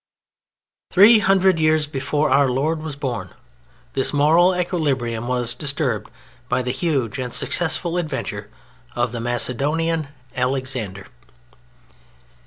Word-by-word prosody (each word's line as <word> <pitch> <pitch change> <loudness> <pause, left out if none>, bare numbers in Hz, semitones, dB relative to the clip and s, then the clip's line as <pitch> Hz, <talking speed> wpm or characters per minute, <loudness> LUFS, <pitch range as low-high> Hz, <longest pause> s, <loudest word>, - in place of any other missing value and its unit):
Three 215 +4 +7
hundred 190 -3 +3
years 155 -1 +3
before 145 0 -1
Our 135 0 +4
Lord 155 +5 -1
was 155 -2 -6
born 120 -10 -5 0.6
this 135 - 0
moral 165 +6 +4
equilibrium 135 -10 -2
was 125 -2 +1
disturbed 140 - -1 0.4
by 125 +1 0
the 125 - -2
huge 135 -5 -2
and 125 -1 -4
successful 175 +3 +1
adventure 155 -5 -5 0.5
of 120 -1 -1
the 120 -1 -5
Macedonian 145 +7 0 0.3
Alexander. 125 -7 -2
140 Hz, 110 wpm, -21 LUFS, 125-160 Hz, 0.6 s, Three